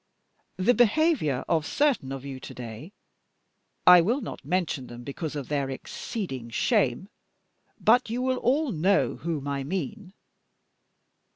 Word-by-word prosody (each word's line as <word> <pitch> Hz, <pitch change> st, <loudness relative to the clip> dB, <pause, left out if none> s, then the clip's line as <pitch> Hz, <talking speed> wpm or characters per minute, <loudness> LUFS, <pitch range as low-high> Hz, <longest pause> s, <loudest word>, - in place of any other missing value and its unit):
The 190 Hz, +7 st, +3 dB
behaviour 245 Hz, -, +2 dB
of 165 Hz, -3 st, +2 dB
certain 260 Hz, -, +1 dB
of 135 Hz, 0 st, -6 dB
you 135 Hz, -2 st, -6 dB
to -, -, -9 dB
day 120 Hz, -, -8 dB, 0.9 s
I 180 Hz, -1 st, +9 dB
will 230 Hz, +11 st, +1 dB
not 230 Hz, -, -7 dB
mention 160 Hz, -4 st, -1 dB
them 120 Hz, 0 st, -10 dB
because 150 Hz, +3 st, -5 dB
of 140 Hz, -4 st, -4 dB
their 140 Hz, -2 st, -1 dB
exceeding 135 Hz, -, -5 dB
shame, 125 Hz, +7 st, +1 dB, 0.7 s
but 240 Hz, +2 st, +4 dB
you 245 Hz, +3 st, -2 dB
will 260 Hz, 0 st, +1 dB
all 275 Hz, +4 st, +1 dB
know 190 Hz, +4 st, +2 dB
whom 155 Hz, -4 st, -3 dB
I 140 Hz, -1 st, -2 dB
mean. 190 Hz, -, -5 dB
165 Hz, 135 wpm, -27 LUFS, 135-225 Hz, 0.9 s, I